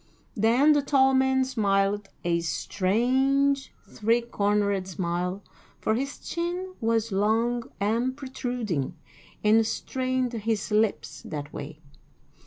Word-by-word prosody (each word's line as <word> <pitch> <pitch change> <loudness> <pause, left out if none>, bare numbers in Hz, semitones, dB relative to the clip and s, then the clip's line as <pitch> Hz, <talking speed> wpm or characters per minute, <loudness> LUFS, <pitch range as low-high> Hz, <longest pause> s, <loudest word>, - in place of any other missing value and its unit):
Then 235 +8 +4
the 290 - +3
tall 270 -1 +3
man 265 0 +3
smiled 205 -4 +1
a 170 -1 +1
strange, 260 +11 +1 0.2
three 230 +3 +1
cornered 205 -4 0
smile, 180 +1 -2 0.4
for 220 - +1
his 275 +5 -2
chin 355 +2 -4
was 225 -1 +1
long 225 +4 +1
and 235 +6 0
protruding, 245 - -3 0.5
and 220 +1 +5
strained 255 +2 -2
his 220 -1 -2
lips 215 0 0
that 145 -1 -6
way. 150 +2 -8
225 Hz, 110 wpm, -26 LUFS, 200-260 Hz, 0.5 s, and